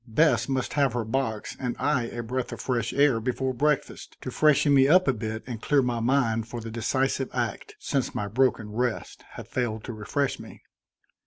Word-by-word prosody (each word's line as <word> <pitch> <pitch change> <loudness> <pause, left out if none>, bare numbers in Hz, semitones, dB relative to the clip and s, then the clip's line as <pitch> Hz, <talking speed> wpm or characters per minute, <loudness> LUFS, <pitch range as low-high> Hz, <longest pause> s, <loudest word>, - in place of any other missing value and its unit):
Bess 150 +6 +3
must 130 -2 -1
have 140 -4 +2
her 120 -2 -1
box 110 -2 -2
and 125 -2 -2
I 140 -5 +1
a 120 0 -5
breath 125 +2 -3
of - - -6
fresh 120 -3 -1
air 140 -4 +3
before 130 +3 -1
breakfast, 150 +3 -1
to 130 - -5
freshen 150 +1 +4
me 135 -1 +6
up 185 +4 +5
a 135 - +4
bit 110 -1 -5
and 120 -3 -6
clear 145 -3 +3
my 120 -1 -1
mind 115 -2 +1
for 120 0 -6
the 115 0 -7
decisive 130 +3 0
act, 425 - -3
since 140 - -2
my 105 - -2
broken 115 -1 +1
rest 120 +1 -3
had - - -9
failed 110 -4 -2
to 120 - -6
refresh 135 +6 -2
me. - - -12
125 Hz, 195 wpm, -26 LUFS, 115-135 Hz, -, me